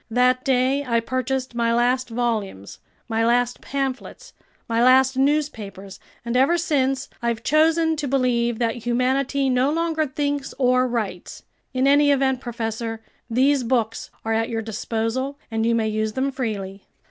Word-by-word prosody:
That 250 +2 +2
day 265 +2 +2
I 235 -3 +1
purchased 255 +2 -2
my 235 -1 +1
last 250 +1 +1
volumes, 225 - -3 0.3
my 225 -1 0
last 245 +1 +1
pamphlets, 275 - -4 0.3
my 230 +1 +1
last 260 +1 +5
newspapers, 255 -9 -1 0.3
and 235 +1 -2
ever 275 +7 +4
since 270 -5 0
I've 235 -1 -2
chosen 320 +1 +3
to 290 -1 -2
believe 245 -3 +1
that 230 0 -1
humanity 255 +4 0
no 255 +2 +2
longer 320 -1 0
thinks 285 0 -3
or 255 -1 +3
writes. 215 -7 -4 0.3
In 260 0 0
any 285 +1 +5
event, 265 -2 +2
professor, 225 -2 -4 0.3
these 265 +4 +3
books 230 -2 -1 0.2
are 225 - 0
at 225 0 0
your 225 -1 -2
disposal, 225 +5 -3
and 225 0 0
you 235 - +2
may 225 -1 +1
use 215 0 -1
them 270 +3 -1
freely." 205 -7 -5
250 Hz, 150 wpm, -23 LUFS, 230-270 Hz, 0.3 s, last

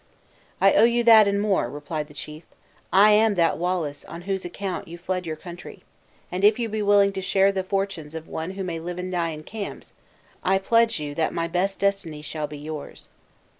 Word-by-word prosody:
"I - - +5
owe - - +5
you 240 +1 +3
that, 220 -3 +8
and 200 0 +1
more," 205 -2 +1
replied 150 +1 -5
the 150 - -16
chief; 150 +1 -8 0.5
"I 200 +4 +7
am 215 0 +4
that 165 -3 +2
Wallace 170 -5 -2
on 170 - -9
whose 190 0 -2
account 185 +2 -5
you 170 +1 -9
fled 180 0 -3
your 160 - -3
country; 175 +2 -11 0.5
and 180 +2 -3
if 210 +1 +6
you 235 -2 -2
be 215 0 -2
willing 200 -1 +4
to 190 - -4
share 195 +1 +3
the 190 -1 -1
fortunes 185 -5 -3
of 160 0 -7
one 160 +2 -4
who 195 - -3
may 170 -3 -4
live 175 +2 -6
and 180 0 -4
die 170 -2 0
in 155 -1 -7
camps, 210 +3 -7 0.5
I 190 +1 +3
pledge 230 +1 +2
you 145 -1 -5
that 160 +1 -1
my 165 0 -1
best 185 +3 -1
destiny 195 -7 -1
shall 150 0 -4
be 150 0 -9
yours." 150 0 -8
185 Hz, 210 wpm, -24 LUFS, 160-200 Hz, 0.5 s, that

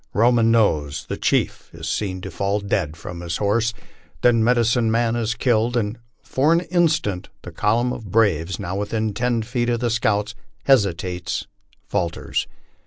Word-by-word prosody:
Roman 115 +1 +4
Nose, 80 -11 +2
the - - -3
chief, - - 0
is - - -6
seen 95 -3 -2
to - - -7
fall 100 +1 0
dead 95 -6 -2
from 85 +1 -8
his 85 -1 -3
horse, 110 +3 +1 0.5
then 115 -2 +5
Medicine 120 0 +3
Man 115 +1 +1
is 115 -1 -1
killed, 120 -1 +1
and 110 +1 -2 0.2
for 145 +4 +1
an 170 +1 +4
instant 160 - 0
the - - -8
column 120 +4 +1
of 110 -3 -8
braves, 95 -5 +2
now 90 +2 -4
within 105 +1 -1
ten 120 0 0
feet 120 +1 -1
of 120 -1 +1
the 120 -1 0
scouts, 105 -2 +1 0.3
hesitates 90 -8 +1 0.4
falters. 85 0 -2
110 Hz, 160 wpm, -22 LUFS, 100-120 Hz, 0.5 s, then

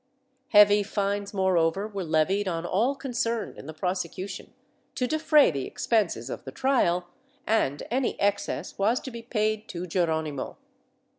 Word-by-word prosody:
Heavy 205 -1 +7
fines 200 0 -2
moreover 190 0 +1
were 200 -3 -5
levied 175 +5 +1
on 170 -2 -2
all 225 +10 +1
concerned 235 -5 -2
in - - -11
the - - -5
prosecution, 180 +3 -4 0.4
to 250 - 0
defray 305 - +4
the 140 -3 -3
expenses 195 - 0
of - - -6
the 130 - -7
trial, 180 - +1 0.4
and 145 -10 +1
any 255 +1 0
excess 200 0 -1
was 220 +5 +2
to 260 - -8
be 235 0 -7
paid 215 -2 -1
to 175 -1 -5
Geron 165 -3 0
imo. 140 -3 -5
200 Hz, 150 wpm, -27 LUFS, 170-225 Hz, 0.4 s, Heavy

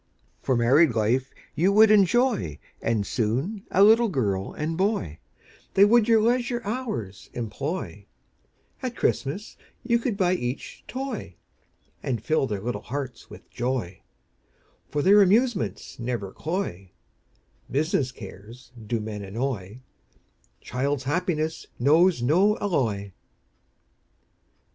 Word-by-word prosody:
For 130 - +1
married 130 +3 +4
life 120 +4 +1 0.2
you 185 +5 +2
would 215 +1 +7
enjoy, 215 - +3 0.2
And 110 -3 0
soon 135 - -2
a 195 - +4
little 225 +2 +6
girl 100 - -1
and 155 +2 -3
boy, 160 - -1 0.6
They 195 - +7
would 230 +1 +4
your 225 -1 +5
leisure 240 +2 +1
hours 210 - -4
employ, 125 - -4 0.7
At 255 -2 -4
Christmas 165 - -2 0.3
you 235 -1 +2
could 230 -4 -2
buy 185 -3 +2
each 125 -6 -4
toy, 255 - -5 0.7
And 120 -3 -2
fill 155 +4 +1
their 105 -4 -3
little 105 -2 -3
hearts 135 +1 -6
with - - -13
joy, 120 -7 -3 0.9
For 145 -1 -1
their 205 +2 +7
amusements 215 +2 +1
never 115 -5 -3
cloy, 150 - -4 0.8
Business 145 -2 0
cares 115 +3 -12 0.2
do 115 +1 0
men 105 -1 -5
annoy, 110 +1 -4 0.8
Child's 135 +1 -2
happiness 160 +1 -1
knows 155 +2 +4
no 185 - +3
alloy. 110 - -1
145 Hz, 115 wpm, -25 LUFS, -, 0.9 s, would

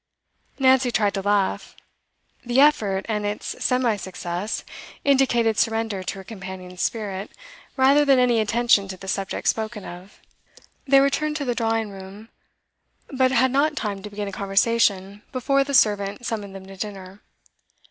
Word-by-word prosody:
Nancy 260 -1 +4
tried 210 -4 +1
to 195 - -2
laugh. 205 -1 0 0.7
The 245 +2 +1
effort, 210 -10 +3
and 210 -2 -2
its 205 +1 -4
semi 250 -4 +1
success, 185 +1 -4 0.4
indicated 240 -5 +3
surrender 225 -3 0
to 185 - -4
her 195 - -9
companion's 185 -3 -8
spirit 200 -3 -3 0.5
rather 275 +3 +5
than 275 -2 +4
any 245 -2 +3
attention 220 -2 +2
to 190 -1 -7
the 190 - -11
subject 195 0 -3
spoken 220 -2 -1
of. 180 +3 -11 0.7
They 275 0 +6
returned 300 +2 0
to 290 -2 -3
the 245 - 0
drawing 225 -2 -1
room, 195 +3 -11 0.8
but 260 -1 +2
had 260 -1 +3
not 295 +3 +2
time 200 -3 -3
to 210 - -8
begin 205 0 -5
a - - -5
conversation 200 0 +1
before 275 +1 +1
the 280 0 -2
servant 205 0 +2
summoned 205 -4 -4
them 190 -1 -9
to 195 0 -12
dinner. 195 -1 -7
215 Hz, 155 wpm, -23 LUFS, 195-250 Hz, 0.8 s, They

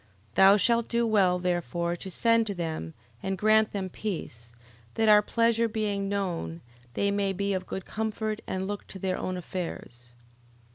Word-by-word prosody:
11:26. - - -33
Thou 195 +1 +7
shalt 235 +2 +2
do 235 0 +1
well, 195 -5 +3
therefore, 175 -1 -1
to 190 - -8
send 230 +3 +3
to 200 - -3
them, 160 - -4 0.3
and 195 0 -2
grant 215 +2 +4
them 195 -2 -3
peace, 160 - -6 0.4
that 225 0 +2
our 210 -1 +8
pleasure 230 +1 +2
being 205 -3 -2
known, 175 - -3 0.3
they 200 0 +1
may 200 -1 0
be 200 +1 -1
of 185 -1 -3
good 190 - -5
comfort, 220 0 -3
and 190 0 -2
look 205 0 -5
to - - -7
their 185 0 -2
own 185 0 -3
affairs. 125 -9 -7
195 Hz, 175 wpm, -28 LUFS, 180-215 Hz, 0.4 s, our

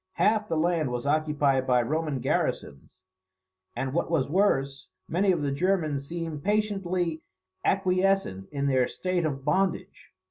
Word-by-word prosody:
Half 215 0 +2
the 165 - 0
land 165 -3 +1
was 125 0 -4
occupied 145 -3 +1
by 125 -1 +3
Roman 150 0 -2
garrisons; 70 - -2 0.8
and, 130 +2 -3
what 170 - 0
was 150 -5 0
worse, 140 -8 +1 0.2
many 190 +4 +2
of 170 -5 0
the 140 - 0
Germans 155 -3 0
seemed 165 -3 -5
patiently 185 -5 0 0.4
acquiescent 185 - +1
in 140 -1 -2
their 130 -3 +2
state 180 -3 -1
of 135 -2 -5
bondage. 185 +4 -1
155 Hz, 140 wpm, -27 LUFS, 140-185 Hz, 0.8 s, by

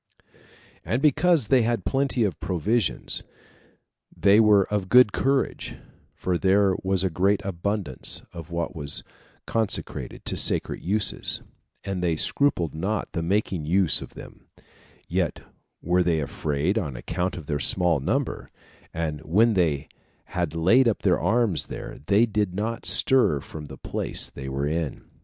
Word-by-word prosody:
And 120 - -1
because 150 - +2
they 130 -2 +5
had 115 +1 -1
plenty 135 -3 0
of 95 -8 -2
provisions, 100 +4 0 1.0
they 100 +5 +5
were 105 -3 +5
of 95 -3 -1
good 125 -4 +6
courage, 135 0 -1 0.4
for 90 -2 -2
there 95 0 +3
was 95 -1 +1
a 95 - +1
great 95 +4 +2
abundance 100 +2 -2
of 85 +1 -9
what 85 -1 -3
was 75 -2 +1 0.4
consecrated 110 -2 -3
to - - -2
sacred - - +3
uses, 100 +2 0 0.4
and 95 -2 -3
they 85 -2 +1
scrupled 85 - 0
not 95 +6 -3
the 85 - -3
making 90 -2 -1
use 90 +1 +2
of - - -10
them; - - -13 0.6
yet - - -1 0.4
were 90 +2 +2
they 85 -2 +1
afraid, 75 +6 -1
on 75 - -5
account 90 +10 -3
of 80 - -8
their 75 0 -2
small 85 +1 +2
number; 65 - -2 0.4
and 80 -2 -3
when 105 +9 +3
they 80 -7 0 0.5
had 85 -3 -2
laid 115 +11 +4
up 115 - -1
their 90 -3 +3
arms 115 -5 +1
there, - - -8
they 105 +4 +4
did 105 -5 -2
not 115 +3 -3
stir 125 - +4
from 75 +2 -9
the - - -10
place - - -3
they 65 -1 -7
were 70 +1 -2
in. 80 -1 -3
95 Hz, 150 wpm, -25 LUFS, 80-110 Hz, 1.0 s, good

